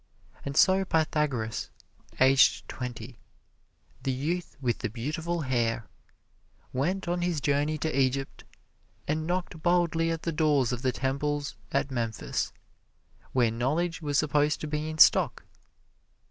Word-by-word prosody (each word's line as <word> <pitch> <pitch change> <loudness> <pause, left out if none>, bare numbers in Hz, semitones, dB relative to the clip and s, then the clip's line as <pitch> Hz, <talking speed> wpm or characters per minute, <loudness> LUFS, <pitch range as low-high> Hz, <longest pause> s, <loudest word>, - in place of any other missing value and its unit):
And 140 0 -4
so 190 +1 +5
Pythagoras, 150 -9 0 0.5
aged 130 0 +5
twenty, 125 -2 -7 0.8
"the 135 - -1
youth 160 +7 -3
with 125 -4 -1
the 120 - -2
beautiful 160 - -3
hair," 120 -4 0 0.9
went 175 +9 -1
on 175 0 0
his 175 -3 0
journey 145 +2 +1
to 155 -1 -2
Egypt 135 +1 -1 0.6
and 155 +1 -1
knocked 175 -2 -2
boldly 170 -1 +2
at 165 -1 -3
the 165 - -1
doors 150 -5 +2
of 125 -1 -3
the 130 -1 +1
temples 140 +3 -2 0.2
at 135 - 0
Memphis, 115 -3 -2 0.8
where 120 -3 +2
knowledge 155 +9 -1
was 145 -2 0
supposed 150 0 +2
to 155 - -3
be 150 +1 -2
in 155 - -5
stock. - - +5
145 Hz, 130 wpm, -28 LUFS, 130-160 Hz, 0.9 s, so